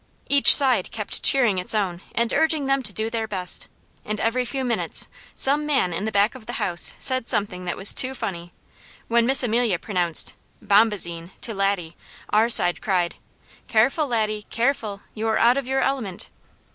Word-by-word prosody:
Each 280 Hz, 0 st, +8 dB
side 265 Hz, -3 st, +4 dB
kept -, -, -4 dB
cheering 240 Hz, -9 st, +3 dB
its 180 Hz, +4 st, +2 dB
own 185 Hz, -4 st, -3 dB
and 235 Hz, 0 st, -1 dB
urging 320 Hz, -2 st, +1 dB
them 275 Hz, 0 st, 0 dB
to 210 Hz, -5 st, -3 dB
do 220 Hz, +3 st, -3 dB
their 225 Hz, -1 st, -3 dB
best, 185 Hz, -4 st, 0 dB, 0.4 s
and 215 Hz, 0 st, -5 dB
every 250 Hz, +2 st, -1 dB
few 265 Hz, +1 st, -5 dB
minutes 240 Hz, -2 st, 0 dB, 0.3 s
some 295 Hz, +2 st, +2 dB
man 265 Hz, -, 0 dB
in 190 Hz, +5 st, -4 dB
the 220 Hz, -, -3 dB
back 205 Hz, +2 st, +1 dB
of 255 Hz, -5 st, -14 dB
the 240 Hz, -, -6 dB
house 180 Hz, -9 st, +1 dB
said 260 Hz, -3 st, +4 dB
something 185 Hz, -3 st, -2 dB
that 175 Hz, -, -5 dB
was 195 Hz, -, +3 dB
too 265 Hz, +1 st, 0 dB
funny. 175 Hz, -6 st, -7 dB, 0.6 s
When 235 Hz, 0 st, +1 dB
Miss 270 Hz, 0 st, +4 dB
Amelia 235 Hz, -4 st, 0 dB
pronounced 175 Hz, -3 st, 0 dB, 0.3 s
"bombazine" 200 Hz, -5 st, 0 dB
to 225 Hz, -, -3 dB
Laddie 195 Hz, -4 st, -3 dB, 0.4 s
our 220 Hz, +2 st, +2 dB
side 175 Hz, -6 st, +4 dB
cried, 180 Hz, -4 st, -2 dB, 0.5 s
"Careful, 270 Hz, +8 st, +1 dB
Laddie, 215 Hz, -3 st, -3 dB
careful! 230 Hz, -5 st, -3 dB
you're 220 Hz, 0 st, -2 dB
out 240 Hz, +2 st, +3 dB
of 275 Hz, -2 st, -4 dB
your 265 Hz, 0 st, -1 dB
element!" 250 Hz, -10 st, -4 dB
220 Hz, 175 wpm, -22 LUFS, 195-255 Hz, 0.6 s, Each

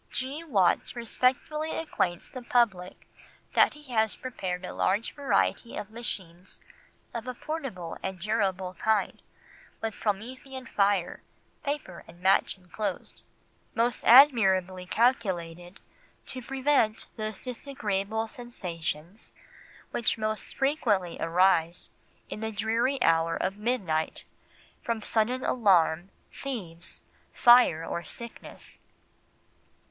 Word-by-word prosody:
"G. 270 Hz, +5 st, -4 dB
Watts 200 Hz, -, +2 dB
respectfully 260 Hz, +6 st, 0 dB
acquaints 180 Hz, -, -1 dB
the 255 Hz, -, -8 dB
public 220 Hz, -7 st, 0 dB, 0.5 s
that -, -, +5 dB
he 295 Hz, -4 st, -12 dB
has 220 Hz, -3 st, +2 dB
prepared 185 Hz, -8 st, -4 dB
a -, -, -6 dB
large 205 Hz, +5 st, +1 dB
variety 240 Hz, -4 st, 0 dB
of 210 Hz, -, -6 dB
machines 185 Hz, -6 st, -6 dB, 0.5 s
of 235 Hz, +1 st, -5 dB
a 250 Hz, -, -4 dB
portable 255 Hz, -, -5 dB
and 190 Hz, -1 st, -4 dB
durable 190 Hz, -2 st, -1 dB
kind, 215 Hz, +4 st, 0 dB, 0.6 s
with 225 Hz, -1 st, -3 dB
Promethean 255 Hz, +6 st, -4 dB
fire, 200 Hz, -5 st, +1 dB, 0.4 s
paper 285 Hz, -, -4 dB
and 170 Hz, +1 st, -15 dB
match 190 Hz, +1 st, +3 dB
enclosed, 190 Hz, +1 st, -5 dB, 0.5 s
most 235 Hz, 0 st, +1 dB
admirably 190 Hz, -9 st, +6 dB
calculated 180 Hz, -7 st, 0 dB, 0.5 s
to 255 Hz, -, -6 dB
prevent 265 Hz, -3 st, +1 dB
those 215 Hz, -2 st, -4 dB
disagreeable 220 Hz, -4 st, -3 dB
sensations 180 Hz, -6 st, -6 dB, 0.6 s
which 230 Hz, -, +1 dB
most 215 Hz, 0 st, -2 dB
frequently 225 Hz, -, 0 dB
arise 170 Hz, 0 st, +2 dB, 0.4 s
in -, -, -6 dB
the 220 Hz, 0 st, -3 dB
dreary 225 Hz, +6 st, 0 dB
hour 165 Hz, 0 st, +3 dB
of 190 Hz, -, -1 dB
midnight, 200 Hz, -8 st, -1 dB, 0.6 s
from 230 Hz, -2 st, -2 dB
sudden 240 Hz, +4 st, +1 dB
alarm, 185 Hz, -6 st, +3 dB, 0.2 s
thieves, 185 Hz, -11 st, -6 dB, 0.3 s
fire, 240 Hz, -10 st, +6 dB
or 170 Hz, -, -3 dB
sickness." 235 Hz, +8 st, -10 dB
215 Hz, 105 wpm, -28 LUFS, 180-245 Hz, 0.6 s, admirably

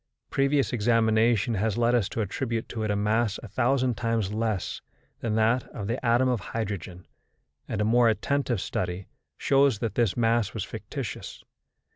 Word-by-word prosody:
Previous 140 Hz, -1 st, +2 dB
examination 115 Hz, -1 st, +2 dB
has 110 Hz, +1 st, 0 dB
led 120 Hz, 0 st, +3 dB
us 115 Hz, -6 st, +2 dB
to 115 Hz, -, -2 dB
attribute 115 Hz, +2 st, -2 dB
to 115 Hz, -, -4 dB
it 110 Hz, -, -1 dB
a 105 Hz, -, +1 dB
mass 105 Hz, +1 st, +1 dB
a -, -, -7 dB
thousand 125 Hz, +3 st, +1 dB
times 115 Hz, -3 st, -1 dB
less 110 Hz, -3 st, -2 dB, 0.4 s
that 110 Hz, -2 st, -1 dB
that 115 Hz, +3 st, +2 dB
of 105 Hz, -, -4 dB
the 115 Hz, +5 st, -3 dB
atom 120 Hz, +2 st, +3 dB
of 125 Hz, -3 st, +1 dB
hydrogen, 95 Hz, -4 st, -5 dB, 0.6 s
and -, -, -3 dB
a -, -, +2 dB
more 120 Hz, +1 st, +4 dB
attentive 130 Hz, 0 st, 0 dB
study 90 Hz, +1 st, -3 dB, 0.3 s
shows 135 Hz, -4 st, +3 dB
that 110 Hz, -2 st, -3 dB
this 115 Hz, -3 st, +1 dB
mass 115 Hz, -3 st, +1 dB
was -, -, -2 dB
fictitious. -, -, -6 dB
115 Hz, 165 wpm, -27 LUFS, 105-120 Hz, 0.6 s, more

